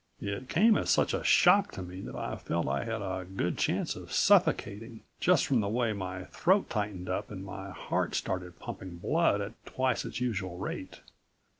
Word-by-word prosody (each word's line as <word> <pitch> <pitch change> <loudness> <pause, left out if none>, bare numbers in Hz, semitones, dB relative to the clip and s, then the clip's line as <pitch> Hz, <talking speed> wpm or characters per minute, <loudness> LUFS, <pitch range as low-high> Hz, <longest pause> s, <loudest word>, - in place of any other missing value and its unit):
It 100 +5 -4
came 215 +6 +5
as - - -2
such - - +3
a - - -1
shock 200 - +5
to 95 - -5
me 90 +1 -8
that - - -7
I - - -3
felt - - -2
I 70 +1 -1
had 115 -2 -3
a 95 -1 -3
good 90 -1 -2
chance - - 0
of - - -10
suffocating, 110 +3 +2 0.2
just 180 -4 +4
from 130 -4 +2
the 100 -2 0
way 115 0 +1
my 95 -2 -5
throat 190 - +1
tightened 100 -4 -2
up 100 +2 -2
and 95 -2 -7
my 95 0 -7
heart 90 - -2
started 90 -2 -3
pumping 90 -2 -7
blood 155 - +2
at 105 +3 -7
twice 130 -2 0
its - - -5
usual 100 -8 -2
rate. 95 0 -6
100 Hz, 190 wpm, -30 LUFS, 95-120 Hz, 0.2 s, came